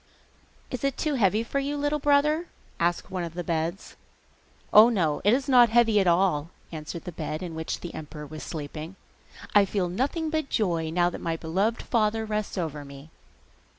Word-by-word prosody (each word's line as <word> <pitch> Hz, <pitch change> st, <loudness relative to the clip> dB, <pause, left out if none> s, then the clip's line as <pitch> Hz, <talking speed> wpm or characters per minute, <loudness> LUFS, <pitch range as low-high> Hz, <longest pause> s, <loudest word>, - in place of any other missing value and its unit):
'Is 255 Hz, -1 st, -5 dB
it 275 Hz, -1 st, 0 dB
too 305 Hz, -, -1 dB
heavy 215 Hz, -3 st, +2 dB
for 275 Hz, +4 st, -2 dB
you, 285 Hz, +1 st, -2 dB
little 290 Hz, +1 st, 0 dB
brother?' 300 Hz, +4 st, +2 dB, 0.3 s
asked 175 Hz, +1 st, 0 dB
one 185 Hz, -2 st, -2 dB
of 170 Hz, -1 st, -6 dB
the 175 Hz, -, -3 dB
beds. 165 Hz, +3 st, -3 dB, 0.8 s
'Oh, 215 Hz, +3 st, +9 dB
no, 170 Hz, -10 st, 0 dB
it 205 Hz, -, +5 dB
is 265 Hz, +3 st, +1 dB
not 245 Hz, -3 st, +6 dB
heavy 225 Hz, -2 st, +4 dB
at 190 Hz, -, +2 dB
all,' 170 Hz, -3 st, +2 dB, 0.2 s
answered 160 Hz, +1 st, -6 dB
the 180 Hz, -, -6 dB
bed 155 Hz, 0 st, -5 dB
in 175 Hz, -2 st, -5 dB
which 160 Hz, 0 st, -4 dB
the 175 Hz, -, -7 dB
emperor 150 Hz, -1 st, -8 dB
was 155 Hz, +1 st, -9 dB
sleeping. 155 Hz, +2 st, -6 dB, 0.6 s
'I 205 Hz, -1 st, +6 dB
feel 190 Hz, -2 st, -1 dB
nothing 285 Hz, -, -1 dB
but 315 Hz, -3 st, -1 dB
joy 170 Hz, -6 st, 0 dB
now 175 Hz, +2 st, +2 dB
that -, -, -7 dB
my 165 Hz, -1 st, -2 dB
beloved 195 Hz, +9 st, -1 dB
father 220 Hz, -1 st, +1 dB
rests 215 Hz, -1 st, -3 dB
over 155 Hz, -4 st, -3 dB
me. 140 Hz, +2 st, -12 dB
190 Hz, 185 wpm, -26 LUFS, 160-240 Hz, 0.8 s, Oh